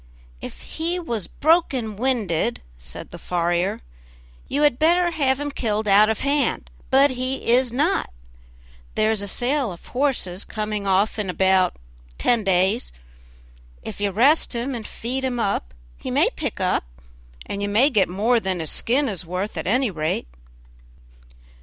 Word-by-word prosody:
"If - - -8
he 335 +3 -3
was 235 - -4
broken 275 -9 +1
winded," 210 - 0
said - - -8
the - - -9
farrier, 175 +1 -1 0.7
"you 290 +2 0
had 290 -5 +3
better 345 +2 +4
have 275 -5 +1
him 290 0 -3
killed 215 -5 -1
out 205 +2 +6
of 220 - -1
hand, 280 +1 0 0.2
but 275 +1 +5
he 255 +1 -3
is 250 0 +3
not; 295 +10 +1 0.9
there 215 0 +2
is 215 -2 0
a 200 - -3
sale 250 +3 +1
of 170 - -12
horses 245 -9 0
coming 210 -2 -4
off 195 +3 +2
in 205 -3 -2
about 190 0 +2 0.4
ten 235 - +2
days; 190 +4 +1 0.9
if - - -7
you 205 - +1
rest 260 - +3
him 245 +3 -2
and 225 -3 -5
feed 255 +3 -4
him 250 -2 -1
up 195 - -1 0.3
he - - -6
may - - +3
pick - - -4
up, - - +1 0.6
and 200 - -5
you 205 - -1
may 240 +8 +4
get 210 -7 +3
more 220 +6 +2
than 190 -4 -2
his 160 -2 -3
skin 270 +5 +1
is 195 -5 -3
worth, 180 +4 -4
at 160 0 -4
any 245 +2 +2
rate." 155 - -2
220 Hz, 160 wpm, -23 LUFS, 190-265 Hz, 0.9 s, out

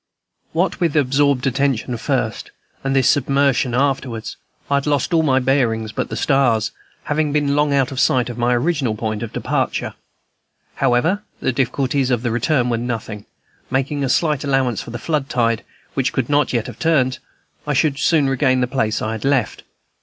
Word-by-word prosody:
What 175 +5 0
with 170 -4 0
absorbed 140 -1 +2
attention 135 -2 0
first, 115 -2 -2 0.3
and 135 0 0
this 135 -2 +3
submersion 140 -3 +2
afterwards, 130 -4 -1 0.3
I 140 - +2
had 140 - -2
lost 145 +1 0
all 165 - +4
my 135 -4 +2
bearings 120 -5 +1
but - - -3
the - - -4
stars, 120 -6 +2 0.3
having 150 0 0
been 145 -1 +1
long 150 0 +2
out 135 -2 +2
of 130 - -4
sight 125 -3 +3
of 120 - -5
my 120 +1 +1
original 135 -4 0
point 110 -1 -3
of 115 - -5
departure. - - -2 0.8
However, 135 +10 +2 0.2
the - - 0
difficulties 135 +1 0
of 120 -2 0
the 120 - 0
return 125 +2 +1
were 115 - +1
nothing; 110 -3 -5 0.4
making 135 +2 -1
a 135 - 0
slight 150 +1 +1
allowance 135 -5 0
for - - -10
the 120 - -5
floodtide, 125 -7 0 0.3
which 135 -1 0
could 130 -3 -1
not 145 -1 +2
yet 115 -3 0
have - - -9
turned, 140 -6 +2 0.5
I - - +1
should 145 -3 +1
soon 155 -5 +3
regain 130 -1 +2
the - - +3
place 120 -4 -1
I 110 - -1
had 110 -1 -5
left. 135 -6 0
135 Hz, 180 wpm, -20 LUFS, 120-140 Hz, 0.8 s, all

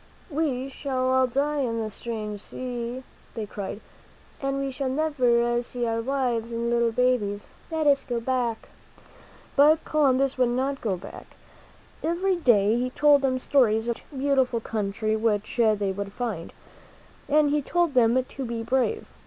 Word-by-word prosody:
"We 280 -4 -1
shall 260 -2 -2
all 260 0 +4
die 285 +4 0
in 230 -4 -1
this 215 -2 -4
strange 215 -3 -5
sea," 245 +1 -5 0.3
they 220 - -3
cried, 200 +1 -6 0.6
"and 275 0 -1
we 275 0 -2
shall 265 0 -3
never 245 -5 +2
see 245 0 -4
our 230 0 -1
wives 245 -3 -1
and 235 0 -2
little 235 -1 +2
babies. 225 -4 0 0.2
Let 320 -2 -1
us 280 -1 +4
go 240 -1 -2
back." 240 -2 -2 0.9
But 305 +3 +5
Columbus 275 -3 +2
would 250 -1 +4
not 265 +3 -1
go 200 -5 -1
back. - - -10 0.8
Every 360 +4 +1
day 230 - +3
he 250 +1 -1
told 290 +2 +4
them 260 -1 +1
stories 235 -4 +2
of 235 - -1
the - - -16
rich, 275 - -7
beautiful 265 -4 +2
country 215 0 -2
which 215 0 -1
they 215 -4 +2
would 200 +1 -5
find. 215 -9 -4 0.8
And 295 0 +4
he 295 0 +2
told 345 +2 0
them 250 0 +4
to 270 +1 -7
be 235 -2 -4
brave. 265 - 0
250 Hz, 160 wpm, -26 LUFS, 230-275 Hz, 0.9 s, But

